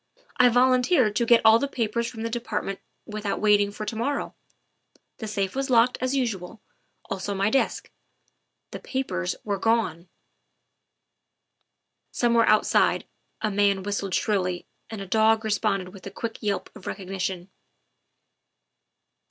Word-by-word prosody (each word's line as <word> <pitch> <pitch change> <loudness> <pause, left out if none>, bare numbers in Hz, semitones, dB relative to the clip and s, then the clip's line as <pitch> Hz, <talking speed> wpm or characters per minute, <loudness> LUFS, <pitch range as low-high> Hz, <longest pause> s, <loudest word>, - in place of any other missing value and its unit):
I 250 0 +6
volunteered 250 - +3
to 235 - +1
get 235 -1 +6
all 220 +1 +7
the 280 - -1
papers 235 -3 -1
from 225 -1 -7
the 230 - -2
Department 225 -4 -3 0.3
without 210 -1 -3
wait 210 -1 +4
ing 200 - 0
for 215 +1 -6
to 210 - -4
morrow. 275 +6 -2 0.8
The 220 - -6
safe 200 -1 -2
was 270 0 -2
locked, 245 0 +4
as 255 +2 0
usual, 225 -6 -3 0.5
also 195 +1 -3
my 195 +2 +1
desk. 270 - 0 0.8
The - - -6
papers 255 - -3
were 200 -2 -2
gone." 185 -7 0 2.0
Somewhere 235 -1 +2
outside 215 - +3 0.4
a 215 - +1
man 200 -1 +2
whistled 200 -1 -2
shrilly 185 -4 -1 0.2
and 220 -3 -6
a - - -5
dog 220 +3 +3
responded 205 -3 0
with 195 0 -11
a - - -4
quick 225 +3 -6
yelp 205 -2 -3
of 215 - -12
recognition. 190 -1 -4
215 Hz, 140 wpm, -25 LUFS, 195-235 Hz, 2.0 s, all